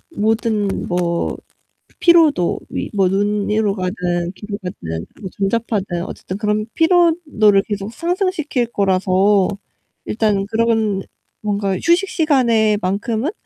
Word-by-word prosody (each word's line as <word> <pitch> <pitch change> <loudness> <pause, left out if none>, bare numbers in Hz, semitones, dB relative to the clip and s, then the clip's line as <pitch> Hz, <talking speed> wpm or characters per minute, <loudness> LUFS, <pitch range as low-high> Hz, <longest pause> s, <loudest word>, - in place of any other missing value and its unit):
모든 220 -1 +1 0.2
뭐 175 -1 -1 0.6
피로도 320 - +4
위 - - -4
눈으로 205 +2 +1
가든 180 -2 -2
귀로 205 -1 -6
가든 80 - -5 0.2
뭐 190 - -5
전자파든 195 -4 -1
어쨌든 190 - -7
그런 210 0 0
피로도를 325 - +3
계속 205 +1 -4
상승시킬 335 - -1
거라서 195 -1 +2 0.6
일단 210 -3 0
그런 220 -3 +1 0.4
뭔가 200 -2 -1
휴식 350 - +2
시간에 235 - +2
만큼은 220 - -1
210 Hz, 235 characters per minute, -19 LUFS, 195-235 Hz, 0.6 s, 피로도